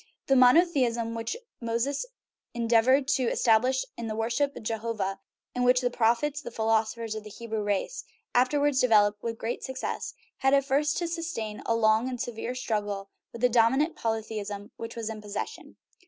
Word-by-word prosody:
The 270 - +3
monotheism 250 -4 +4
which 230 - -3 0.2
Moses 240 - -1 0.5
endeavored 240 +4 +3
to 260 -2 +2
estab 225 -2 +4
lish 260 +1 0
in 235 - -5
the 215 - -3
worship 235 +6 0
of - - -8
Jehovah, 215 -3 -2 0.3
and 250 - -1
which 250 0 +5
the 245 -1 0
prophets 245 +6 +1
the - - -7
philosophers 225 0 0
of 215 -1 -6
the 210 - -9
Hebrew 225 0 -4
race 205 - -2 0.3
afterwards 280 +2 +3
developed 210 -4 +4
with 230 -1 -3
great 230 +2 -4
success, 260 0 -4 0.2
had 270 +1 +3
at 275 -1 +2
first 290 +2 +1
to 345 - -1
sustain 330 -11 -4
a 230 - +2
long 220 +2 +3
and 250 -1 -5
severe 240 0 -4
struggle 205 -5 -3 0.2
with 235 - -9
the 250 - +6
dominant 255 +8 +3
polythe 225 -1 -2
ism 205 +1 -7
which 230 0 -7
was 230 -2 -4
in 220 -1 -5
possession. 205 -1 -6
230 Hz, 175 wpm, -28 LUFS, 220-260 Hz, 0.5 s, the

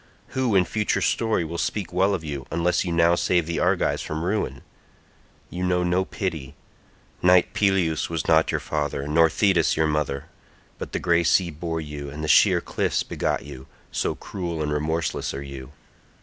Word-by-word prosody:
Who 130 -5 0
in 90 -1 +5
future 105 +4 0
story 110 -7 +1
will 85 +1 -5
speak 95 -5 -2
well 95 +2 +2
of 85 - -6
you 70 -5 -5
unless 85 +2 +1
you 90 - -3
now 85 0 +4
save 85 -1 +1
the 85 0 -2
Argives - - +1
from 80 +1 -4
ruin? 90 - -2 0.9
You 90 +1 -4
know 90 0 +1
no 90 +2 +1
pity; 80 - -4 0.7
knight 90 +1 +4
Peleus 95 -7 +1
was 80 -3 -3
not 80 -1 +4
your - - 0
father 75 -2 -3
nor 80 +2 +4
Thetis 90 -2 +2
your 80 - +3
mother, 75 -3 -1 0.5
but - - -6
the - - 0
grey 85 0 +2
sea 85 +1 +3
bore 80 +1 -4
you 75 -2 -7
and 75 +2 -7
the - - -2
sheer - - +5
cliffs - - -1
begot - - -2
you, 70 -2 -10 0.2
so - - -1
cruel 85 -5 -4
and 75 0 -1
remorseless 80 +1 -2
are 70 - -5
you. 70 -1 -9
85 Hz, 180 wpm, -24 LUFS, 75-90 Hz, 0.9 s, in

